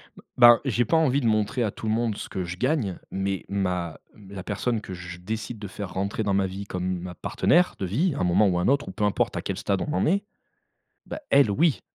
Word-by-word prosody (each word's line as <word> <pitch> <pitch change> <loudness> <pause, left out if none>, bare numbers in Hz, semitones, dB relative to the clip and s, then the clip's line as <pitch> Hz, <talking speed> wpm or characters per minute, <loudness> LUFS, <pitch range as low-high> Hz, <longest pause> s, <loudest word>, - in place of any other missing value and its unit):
B - - -14 0.2
ben, 120 -1 +8
j'ai 120 -2 +1
pas 165 - +2
envie 145 -3 +2
de - - -3
montrer 110 +2 +1
à 110 - 0
tout 110 - -7
le 110 - +2
monde 115 -1 0
ce - - -7
que 95 - -3
je 90 +1 -6
gagne, 125 - 0
mais 95 0 -2
ma 90 -5 -2 0.3
la 100 -2 -7
personne 110 +3 -2
que 95 - -8
je 90 -1 -8
décide 110 +4 -5
de 105 - -6
faire 95 -1 -7
rentrer 100 +3 -2
dans 100 -2 0
ma 95 0 +2
vie 95 +2 -6
comme 90 -1 -3
ma 90 0 -7
partenaire 180 - +2
de 95 - -1
vie 145 - +1
à - - -4
un - - +1
moment 90 +4 +4
ou 90 -2 +1
un 90 - 0
autre 140 +2 +2
ou - - -5
peu 105 - -4
importe 105 -1 +1
à - - -2
quel - - -4
stade 100 -1 -1
on 150 - -2
en - - +1
est, 200 +5 +2 0.8
bah, - - -6
elle 140 -5 +5
oui. 150 +7 +2
105 Hz, 255 wpm, -25 LUFS, 95-120 Hz, 0.8 s, ben